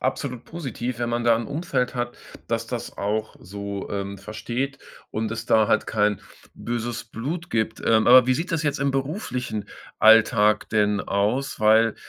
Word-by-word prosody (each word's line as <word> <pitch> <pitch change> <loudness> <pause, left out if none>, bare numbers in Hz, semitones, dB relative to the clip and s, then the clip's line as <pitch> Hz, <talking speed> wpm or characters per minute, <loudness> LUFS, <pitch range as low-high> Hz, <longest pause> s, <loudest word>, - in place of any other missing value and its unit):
absolut 125 -4 -3
positiv, 125 -7 -5
wenn 120 -1 -1
man 120 0 -1
da 115 -1 +5
'n 115 - -4
Umfeld 140 -5 -2
hat, 120 -1 -3 0.3
dass - - -1
das - - -6
auch 105 +2 -2
so, 100 +1 -6
ähm, 100 -1 -4
versteht 125 +5 -4 0.3
und 110 0 -2
es 115 0 -5
da 110 -1 +4
halt - - +2
kein 105 -2 +1 0.3
böses 120 0 -4
Blut 150 +11 -5
gibt. 110 0 -1
Ähm, 110 -1 +3
aber 125 0 +8
wie 130 - +3
sieht 165 +5 -3
das 160 -1 0
jetzt 145 -1 0
im 140 0 +2
beruflichen 135 - -3 0.3
Alltag 110 -1 +5
denn 105 -2 +2
aus? 105 +9 -1
Weil 110 +1 +5
115 Hz, 170 wpm, -24 LUFS, 105-130 Hz, 0.3 s, aber